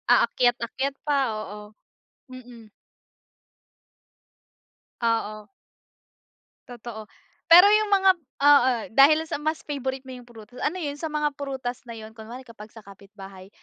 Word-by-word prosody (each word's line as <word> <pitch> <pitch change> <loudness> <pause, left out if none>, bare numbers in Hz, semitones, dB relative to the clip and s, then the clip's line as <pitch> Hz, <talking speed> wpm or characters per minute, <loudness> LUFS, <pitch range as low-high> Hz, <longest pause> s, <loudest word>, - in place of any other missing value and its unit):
Aakyat-ayat 250 +3 0
pa, 295 -1 +1 0.2
oo, 210 0 -8 0.7
mm. 245 -3 -12 2.4
Oo. 215 -2 -2 1.2
Totoo. 230 -3 -9 0.4
Pero 345 +2 +9 0.2
yung 430 - -2
mga 390 -1 +4 0.3
oo, 285 -3 +6 0.2
dahil 295 +6 +5
sa 315 - -5
mas 310 +1 -3
favourite 265 -2 -5
mo 260 - -11
yung 250 -1 -11
prutas, 235 +1 -14
ano 310 - -2
yun? 290 0 -5
Sa 320 - -3
mga 300 -1 -1
prutas 265 -3 -6
na 230 - -8
yun 220 0 -10
kunwari, 230 +3 -11
kapag 225 -3 -13
sa 225 - -12
kapitbahay. 195 -1 -14
245 Hz, 125 wpm, -24 LUFS, 220-285 Hz, 2.4 s, Pero